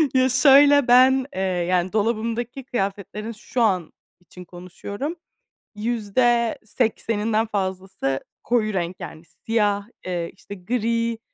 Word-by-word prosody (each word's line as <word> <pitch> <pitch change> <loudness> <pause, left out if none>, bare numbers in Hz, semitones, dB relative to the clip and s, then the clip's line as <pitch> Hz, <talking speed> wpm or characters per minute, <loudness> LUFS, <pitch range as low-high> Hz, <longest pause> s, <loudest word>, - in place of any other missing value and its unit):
Ya, 260 0 +4
şöyle, 280 +2 +6
ben, 260 +2 +6
eee, 190 - -2
yani, 180 0 0
dolabımdaki 230 +4 -1
kıyafetlerin 205 -1 -3
şu 230 +3 -4
an 185 -7 +1 0.3
için 180 0 -13
konuşuyorum; 190 - -6 0.6
%80'inden 225 0 0
fazlası 190 -8 -2 0.2
koyu 220 -3 +1
renk, 180 -1 -2
yani 160 - -9
siyah, 205 +2 -1 0.2
eee, 175 -2 -3
işte 200 - -10
gri, 230 +3 -1
215 Hz, 105 wpm, -23 LUFS, 190-240 Hz, 0.6 s, şöyle